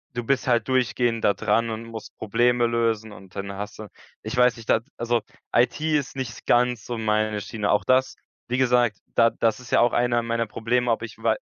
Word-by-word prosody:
Du 120 - -2
bist 135 +2 0
halt 120 -3 +2
durchgehend 120 -3 +1
da 100 - +4
dran 110 +2 0
und 110 +1 -5
musst 115 -1 -9
Probleme 120 +3 +2
lösen. 115 -2 0
Und 95 -2 -14
dann 100 0 -4
hast 105 +2 -7
du 110 - -7 0.3
ich 110 +2 -5
weiß 125 0 +5
nicht. 115 - -12
Da, - - +5 0.2
also, 120 0 0 0.3
IT 120 +4 +2
ist 150 -4 0
nicht 130 -3 -6
ganz 120 -1 +2
so 120 - -4
meine 110 -1 0
Schiene. 105 -1 -2
Auch 105 - +2
das 130 +1 +2 0.3
wie 125 - -1
gesagt 120 -5 +3 0.2
da 115 -1 +5
das 115 0 0
ist 125 - -12
ja - - +4
auch 120 0 +4
einer 120 -1 +2
meiner 115 0 -1
Probleme. 120 +3 0
Ob 115 - 0
ich 115 -2 -8
wei 115 -1 +1
115 Hz, 215 wpm, -24 LUFS, 110-125 Hz, 0.3 s, weiß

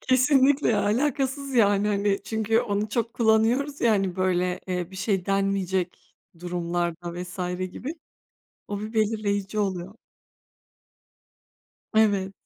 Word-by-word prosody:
Kesinlikle. 270 +2 +3
Ya, 210 -3 +2
alakasız, 275 +4 0
yani, 205 -3 +4
hani, 200 -1 0
çünkü 220 +1 +1
onu 210 -2 -1
çok 230 +1 -2
kullanıyoruz 235 +6 +2
ya 235 - +4
hani, 195 -3 0
böyle, 180 0 0
eee 180 -1 -3
,bir 190 - -10
şey 190 -2 -1
denmeyecek 190 -2 -1 0.3
durumlarda 175 -1 -3
vs. 180 +1 -10 0.3
gibi. 295 +7 -5 0.7
O 205 -1 -4
bir 215 +2 -6
belirleyici 210 -2 0
oluyor. 190 0 -2 2.0
Evet. 200 -3 +3
205 Hz, 115 wpm, -25 LUFS, 185-230 Hz, 2.0 s, yani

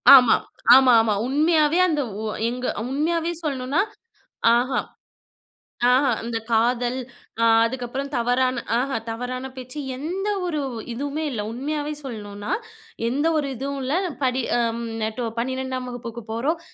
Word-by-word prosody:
ஆமாம், 250 -4 +6 0.3
ஆமா 260 -1 +7
ஆமா. 225 -1 +1
உண்மையாவே 305 +3 +3
அந்த 300 -3 +1 0.2
உ - - -4 0.3
எங் 250 +1 -4 0.3
உண்மையாவே 330 +4 0
சொல்லணும்னா 275 +2 0 0.8
ஆஹ, 250 +3 +1 1.2
ஆஹ 260 +3 +4 0.2
அந்த 230 0 -3
காதல், 240 +2 +2 0.4
அ - - +4 0.2
அதுக்கப்புறம் 260 +3 -3
தவறான 245 +1 +1 0.2
ஆஹ 260 -1 0
தவறான 255 +3 -4
பேச்சு 255 +3 -7 0.2
எந்த 360 +8 -3 0.2
ஒரு 310 -4 -1 0.3
இதுவுமே 285 +5 -3
இல்ல. 225 -5 -2
உண்மையாவே 295 +5 -3
சொல்லணுனா, 205 -5 -6 0.6
எந்த 285 +6 +1
ஒரு 285 -2 0
இதுவும் 275 +3 -4
இல்ல. 265 - -1 0.3
படி 255 0 +1 0.4
ம் 235 - -4 0.2
நேட்டோ 220 +3 -2
12 260 +1 -2
வகுப்புக்கு 235 -2 -7
போறோம். 280 +9 0
255 Hz, 125 wpm, -23 LUFS, 240-290 Hz, 1.2 s, ஆமா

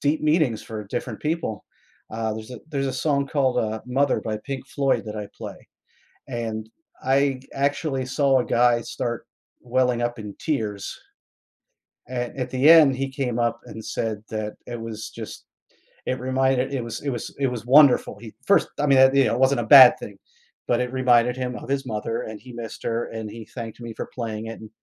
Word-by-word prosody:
deep 150 +2 +1
meanings 150 -7 +2
for 110 -2 -7
different 115 +1 -4
people, 150 -9 -2 0.5
uh, 110 0 -2
there's 110 +2 -8
a 125 - -7
there's 140 -2 -1
a 130 - -2
song 140 +1 0
called, 130 -4 +1
uh, 110 -1 -1
"Mother" 135 +2 +1
by 110 -1 -3
Pink 135 +3 -6
Floyd 140 -4 0
that 105 0 -5
I 105 -1 -5
play, - - -9 0.6
and 110 -3 -4 0.3
I 135 0 +2 0.2
actually 140 -1 0
saw 135 0 +2
a 125 - -1
guy 120 0 +3
start 120 +1 -4 0.3
welling 125 -1 +1
up 120 -1 -2
in 105 -2 -7
tears. 110 -10 -3 1.1
At 125 0 -4
at 125 -1 -2
the 130 +4 +4
end, 155 -5 +8
he 135 +1 -2
came 130 -3 -2
up 120 0 0
and 110 - -9
said 110 -2 -3
that 110 -1 -3
it 120 -1 -5
was 110 -1 -6
just - - -9 0.6
it 130 - -1
reminded 130 +1 +1
it 130 - -1
was 115 0 -6
it 140 - -2
was 120 - -5
it 140 - +2
was 120 -2 -4
wonderful, 135 -5 +5
he 110 -2 -10
first 200 - +4
I 145 - +2
mean, 135 -1 +5
e 140 - +4
you - - +4
know, - - +1
it - - -2
wasn't 130 -1 +3
a 115 - -4
bad 130 -2 +10
thing, 100 -2 -9 0.5
but 120 - +2
it 125 +1 -3
reminded 125 -1 +3
him 125 -1 -3
of - - -9
his 140 -1 -1
mother, 115 0 -3
and 110 -1 -7
he 125 -1 -12
missed 115 -2 -7
her, 115 0 -1
and 110 -1 -6
he 115 0 -8
thanked 115 -1 -8
me 115 -1 -6
for - - -4
playing 110 -2 -4
it, 115 - -8
and 110 - -10
125 Hz, 205 wpm, -24 LUFS, 115-135 Hz, 1.1 s, bad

